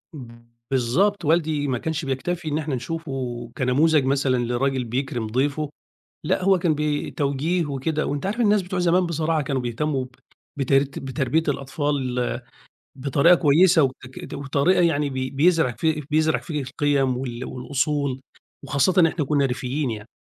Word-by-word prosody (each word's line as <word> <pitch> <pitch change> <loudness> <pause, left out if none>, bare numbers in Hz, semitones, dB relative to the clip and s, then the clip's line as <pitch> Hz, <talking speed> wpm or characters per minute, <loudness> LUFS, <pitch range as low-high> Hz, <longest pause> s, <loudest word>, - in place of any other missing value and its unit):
إمم، 115 -3 -11 0.3
بالضبط، 145 - +1
والدي 155 -2 +1
ما 125 -2 0
كانش 160 +1 -3
بيكتفي 160 +6 -3
إن 150 0 0
إحنا 150 -3 -2
نشوفه 130 -4 -5
كنموذج 140 +3 +3
مثلًا 135 -1 +1
لراجل 130 +2 0
بيكرِم 120 -1 -3
ضيفه، 140 +6 -1 0.5
لأ، - - 0
هو 190 -2 +4
كان 165 -3 +1
بي 150 0 -1
توجيه 150 +5 0
وكده 150 +2 -2
وأنت 145 +2 -3
عارف 210 +5 -2
الناس 210 -2 +4
بتوع 180 0 -4
زمان 175 +1 +3
بصراحة 160 -1 0
كانوا 135 -2 -2
بيهتمّوا 130 +3 -2
ب - - -15 0.5
بترت 135 +1 +1
بتربية 135 +4 -1
الأطفال 145 +2 -1 1.0
بطريقة 140 +5 +4
كويسة 165 +1 +5
وتك 130 0 -5
وطريقة 140 +6 +1
يعني 150 -4 +2
بي 130 -1 -3
بيزرع 160 -2 +3
في 155 +6 -1
بيزرع 155 0 +2
فيك 150 -5 -4
القيم 135 -3 +1
وال 125 -1 -5
والأصول، 135 +1 -2 0.4
وخاصةً 175 +6 +3
إحنا 155 -3 -2
كًنّا 140 -1 +2
ريفيّين 130 +1 -2
يعني. 110 0 -7
140 Hz, 150 wpm, -23 LUFS, 130-160 Hz, 1.0 s, كويسة